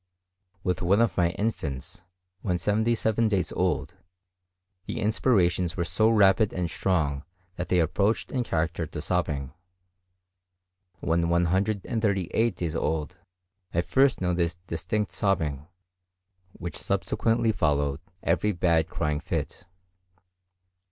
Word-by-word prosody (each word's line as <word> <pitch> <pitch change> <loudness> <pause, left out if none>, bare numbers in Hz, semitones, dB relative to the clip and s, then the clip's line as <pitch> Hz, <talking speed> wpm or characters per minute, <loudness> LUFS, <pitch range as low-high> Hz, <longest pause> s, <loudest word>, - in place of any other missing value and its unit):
With 90 -1 -1
one 95 +4 +3
of 115 -1 +2
my 85 -2 +3
infants, 80 -10 -3 0.4
when 90 -4 0
seventy 110 +5 +1
seven 110 0 +1
days 100 -4 0
old, - - -1 0.9
the - - -3
inspirations 95 -6 +2
were 85 - +1
so 110 +6 +2
rapid 105 -1 +4
and 90 -2 -2
strong 75 -7 0 0.3
that 90 -1 -4
they 90 - +3
approached 100 +6 +1
in 125 -2 0
character 80 -4 -1
to - - -7
sobbing; 75 -5 -1 1.5
when 85 0 +1
138 100 +4 +1
days 85 -2 -3
old 75 -1 -2 0.6
I 85 - +4
first 130 +10 +2
noticed 85 -2 0
distinct 95 +5 -2
sobbing, 80 -8 -1 0.9
which 85 0 -7
subsequently 115 0 +1
followed 70 -6 0 0.2
every 105 +5 +1
bad 85 -2 +2
crying 75 -1 -1
fit. 90 +3 -4
90 Hz, 115 wpm, -27 LUFS, 80-105 Hz, 1.5 s, rapid